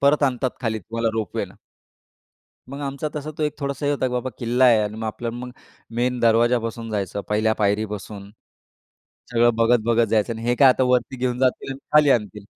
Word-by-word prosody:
परत 145 +2 +3
आणतात 130 -2 +1
खाली 110 -3 -1
तुम्हाला 115 +4 -2
रोपवेला. 110 -2 -3 1.1
मग 140 +2 -7
आमचा 140 +2 -3
तसा 150 0 -4
तो - - -1
एक 150 -1 0
थोडासा 140 0 -3
हे - - +2
होता, 140 -2 0
की 125 - -3
बाबा 125 +1 -2
किल्ला 120 +2 +2
आहे 120 -3 +6
आणि 105 0 -3
मग 110 0 -4
आपल्याला 115 +2 -4
मग 125 +1 -7 0.5
मेन 125 +1 0
दरवाज्यापासून 115 0 +1
जायचं 100 -1 -2
पहिल्या 110 +1 +2
पायरीपासून 105 -1 -2 1.0
सगळं 120 0 +4
बघत, 115 +1 +4
बघत 115 0 +3
जायचं 110 +1 +1
आणि 115 - -8
हे 120 - +3
काय 135 0 +7
आता 130 0 +3
वरती 125 +1 +1
घेऊन 125 -1 -1
जातील 130 +1 0
आणि 135 - -9
खाली 150 -2 +6
आणतील. 105 -3 0
120 Hz, 190 wpm, -22 LUFS, 110-130 Hz, 1.1 s, काय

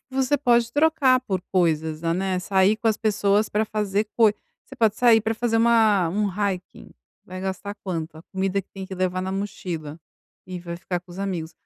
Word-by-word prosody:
você 265 +1 +2
pode 240 -4 +2
trocar 290 -4 +4
por 190 -7 -2
coisas, 160 -4 +1
né, 180 +2 0
sair 190 +2 +3
com 225 +1 -2
as 220 - +2
pessoas 210 -1 +2
para 210 +1 0
fazer 210 -1 -1
coisas. 215 -3 +4 0.2
Você 270 - -12
pode 225 -4 +2
sair 230 -2 +5
para 225 +1 -1
fazer 225 0 0
uma 220 -6 +4
um 205 +4 0
hiking. 195 -1 -4 0.3
Vai 185 +1 -8
gastar 190 +2 -4
quanto? 165 -4 -4
A 160 - -13
comida 190 +1 -2
que 195 - -9
tem 195 - -7
que 190 0 -7
levar 185 0 -1
na 190 0 -3
mochila 170 -6 -5 0.5
e 185 -1 -6
vai 170 -1 -6
ficar 175 0 -4
com 180 0 -16
os 180 - -9
amigos. 175 -5 -3
195 Hz, 195 wpm, -24 LUFS, 180-220 Hz, 0.5 s, sair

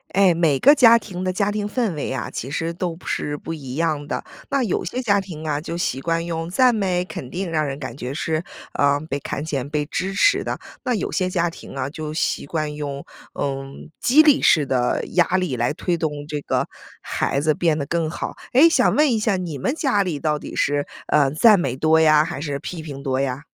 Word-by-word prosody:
诶， 195 -3 +5
每 165 -4 +2
个 285 - +7
家 235 -5 +7
庭 185 -5 -6
的 185 - 0
家 200 +2 0
庭 210 0 -2
氛 225 -5 0
围 145 -3 -4
啊， 130 - -4
其 130 - -5
实 165 +2 -2
都 175 -1 -3
不 170 - -17
是 145 0 -2
不 165 - -6
一 135 -5 -7
样 155 -3 -1
的。 - - -3 0.3
那 275 -2 +1
有 215 - -1
些 240 +8 -4
家 200 -4 +3
庭 160 -5 -8
啊， 145 -1 -1
就 170 +1 -5
习 135 -6 -1
惯 165 +2 -1
用 165 -1 -3
赞 250 +7 +4
美、 185 -4 0
肯 175 -8 -7
定， 180 +2 -4
让 155 -2 +1
人 140 -2 -3
感 130 -4 -6
觉 125 -2 -5
是， 155 +3 -2 0.4
嗯， 145 +1 +2
被 140 -2 -3
看 140 +1 -4
见、 140 -4 -3
被 150 -1 -1
支 185 +5 -3
持 400 - +4
的。 - - -3 0.2
那 250 -2 0
有 200 - -2
些 185 -1 0
家 175 -1 +1
庭 165 - -9
啊， 135 -1 -2
就 155 0 -5
习 155 -2 -1
惯 155 -1 -2
用， 145 -2 -5 0.3
嗯， 135 +1 -4
激 295 +6 +6
励 295 -3 +5
式 155 -4 +4
的 125 -2 0
压 175 -2 +3
力 180 -8 -1
来 120 +3 0
推 175 +2 -1
动 160 -2 -1 0.2
这 150 -1 -4
个 - - -1 0.3
孩 135 - -1
子 155 +2 +2
变 160 0 +1
得 140 - -2
更 165 +1 -1
好。 160 - -5 0.2
诶， 275 +7 +8
想 330 - +3
问 295 -3 +4
一 225 - +1
下 215 -2 +1
你 170 -6 -5
们 255 - -1
家 270 -10 +1
里 175 -7 -2
到 150 0 0
底 - - -8
是， 145 0 0 0.2
嗯， 145 -1 +3
赞 210 +3 +6
美 135 -7 -1
多 160 +3 +4
呀， 155 -1 +5
还 140 - -5
是 145 -2 -3
批 165 +3 -6
评 140 -3 -8
多 130 -1 0
呀？ 135 0 -2
160 Hz, 250 characters per minute, -22 LUFS, 145-185 Hz, 0.4 s, 诶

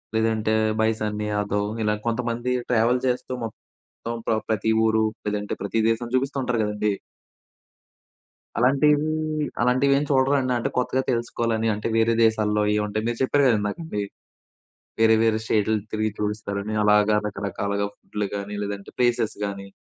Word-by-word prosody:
లేదంటే, 110 -1 +1 0.3
బై 110 - +4
సన్నీ 105 0 -2
యాదవ్ 105 0 0 0.2
ఇలా 105 0 +2
కొంతమంది 120 +1 -1 0.2
ట్రావెల్ 120 +1 +3
చేస్తూ 125 0 -2
మొత్తం 115 +1 -10
ప్ర - - +3 0.2
ప్రతి 110 0 +1
ఊరు, 110 0 +3 0.2
లేదంటే 105 0 -2
ప్రతి 100 +3 -1
దేశం 115 +1 -1
చూపిస్తూ 135 +2 0
ఉంటారు 125 -2 0
కదండీ. 105 0 0 1.6
అలాంటీయన్ని 150 +5 +3 0.5
అలాంటివి 130 +3 +3
ఏం 140 - +1
చూడరా 135 +1 +3
అండి? 130 -1 0
అంటే 120 - -1
కొత్తగా 130 +1 +1
తెలుసుకోవాలని, 115 -1 -1
అంటే 105 - -3
వేరే 115 +1 +3
దేశాల్లో 105 -1 +2
ఏవి 105 - +2
ఉంటాయి. 110 +2 -2
మీరు 120 0 -1
చెప్పారు 140 +2 +3
గదా 115 -3 +4
ఇందాక 105 +7 -3
మీర్ 100 -1 -2 0.9
వేరే, 110 0 +6
వేరే 110 -1 +3
స్టేట్‌లు 110 0 +2 0.2
తిరిగి 110 0 0
చూయిస్తారని 105 0 -3
అలాగా 105 0 +4
రకరకాలుగా 100 0 -2
ఫుడ్‌లు 105 -1 -4
గానీ, 100 +1 -5
లేదంటే 100 -1 -5
ప్లేసెస్ 120 -3 +2
గానీ. 100 -1 -5
110 Hz, 145 wpm, -24 LUFS, 105-120 Hz, 1.6 s, వేరే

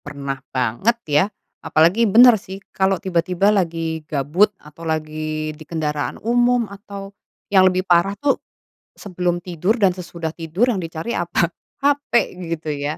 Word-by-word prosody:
Pernah 140 -1 -5
banget 130 - 0
ya, 150 -1 +3 0.4
apalagi 180 +9 +3
bener 240 +4 +8
sih 190 +1 -8 0.2
kalau 190 0 +2
tiba-tiba 185 +2 +1
lagi 165 -4 -1
gabut, 155 +8 +2
atau 150 +2 -16
lagi 155 -1 -3
di 155 - -17
kendaraan 150 -2 -3
umum, 240 0 +3
atau 200 -1 -9 0.4
yang 185 -1 +7
lebih 185 0 -1
parah 180 +3 +3
tuh 280 +5 0 0.6
sebelum 180 -3 -2
tidur 180 +6 0
dan 195 -5 +3
sesudah 170 -3 -6
tidur 175 +10 0
yang 190 - -2
dicari 165 +6 -5
apa? 175 0 0 0.3
Hape 285 -4 +2
gitu 165 -4 -4
ya. 145 +1 -3
175 Hz, 145 wpm, -21 LUFS, 155-200 Hz, 0.6 s, bener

